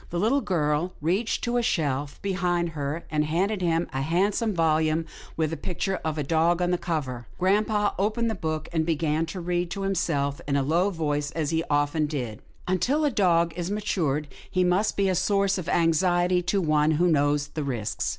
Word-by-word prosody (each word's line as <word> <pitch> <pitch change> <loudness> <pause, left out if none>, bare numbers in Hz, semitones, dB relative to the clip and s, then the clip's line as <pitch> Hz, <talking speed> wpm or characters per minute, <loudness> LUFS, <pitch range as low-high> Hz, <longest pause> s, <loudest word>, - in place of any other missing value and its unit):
The 175 - -3
little 240 +9 +2
girl 160 - 0
reached 185 +9 0
to 240 0 0
a - - +3
shelf 145 - -1
behind 180 -3 0
her 150 +1 -4
and 150 -1 +2
handed 185 +7 0
him 170 -1 +1
a 135 - -1
handsome 195 +9 +1
volume 160 -2 +1 0.3
with 160 -1 0
the 165 - -3
picture 190 +1 -2
of 155 -1 -2
a 150 - -1
dog 165 +4 +2
on 180 0 +1
the 180 - +1
cover. 130 -9 -3
Grampa 205 +2 +2
opened 220 +4 +1
the 225 - 0
book 155 -5 -3
and 160 -1 +2
began 160 0 0
to 185 +3 -6
read 175 0 -1
to 195 +2 -4
himself 145 -7 -1
in 140 - 0
a 140 - +2
low 170 +7 +2
voice 150 -5 -1
as 155 -2 -2
he 165 0 +1
often 145 +1 +1
did. 125 -8 -4
" - - -30
* - - -25
Until 250 - +1
a 295 - +3
young - - -8
dog 170 -5 +3
is 175 0 -3
matured, 170 -8 -1 0.2
he 185 - +1
must 180 +4 +1
be 200 -1 +2
a 190 - +2
source 195 +1 +1
of 175 - -5
anxiety 175 +2 +2
to 185 +3 0
one 155 -3 +2
who 175 +2 +3
knows 145 -2 +2
the 155 - -4
risks. 120 -6 -2
170 Hz, 210 wpm, -26 LUFS, 150-190 Hz, 0.3 s, a